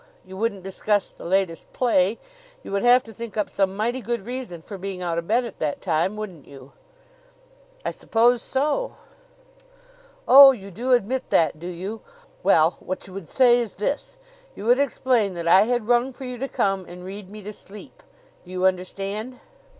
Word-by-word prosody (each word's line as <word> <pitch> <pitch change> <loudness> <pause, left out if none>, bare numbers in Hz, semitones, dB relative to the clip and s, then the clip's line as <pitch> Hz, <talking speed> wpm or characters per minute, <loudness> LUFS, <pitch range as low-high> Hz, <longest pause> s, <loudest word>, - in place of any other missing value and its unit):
You 190 - -11
wouldn't 200 -2 -2
discuss 200 +1 -1
the - - -13
latest 185 -2 -1
play? 220 -4 +2 0.5
You - - -9
would 200 0 0
have 245 +1 +5
to 225 - -12
think 230 -1 -8
up 210 - -1
some 195 -1 0
mighty 240 +4 -1
good 235 -4 -3
reason 240 -9 -6
for 200 -3 -9
being 190 -1 -5
out 170 -1 -1
of 170 - -8
bed 240 +3 +2
at 230 - -9
that 150 -2 -2
time, 175 +3 0
wouldn't 190 -8 -8
you?" 135 -1 -13 1.1
"I - - 0
suppose 235 +1 +2
so." 300 - -1 1.3
"Oh, 275 0 +10
you 200 -5 -10
do 245 +8 0
admit 250 +2 0
that, 155 -2 +2
do 175 - -7
you? 190 +5 -6 0.4
Well, 160 - +4
what 185 - -5
you 190 - -11
would 195 -4 -8
say 245 -2 +5
is 230 -5 -3
this: 280 - -3 0.4
You - - -8
would 245 +3 +4
explain 245 -7 +1
that 170 -1 -4
I 190 +4 +6
had 240 -2 -1
rung 245 +2 +2
for 265 +1 -9
you 250 -1 -6
to 270 - -2
come 195 -6 0
and 180 +1 -10
read 195 0 -8
me 210 0 -10
to 210 +2 -7
sleep. 205 0 -11 0.4
Do 180 - -17
you 185 0 -1
understand?" 195 +6 -2
205 Hz, 190 wpm, -24 LUFS, 185-245 Hz, 1.3 s, Oh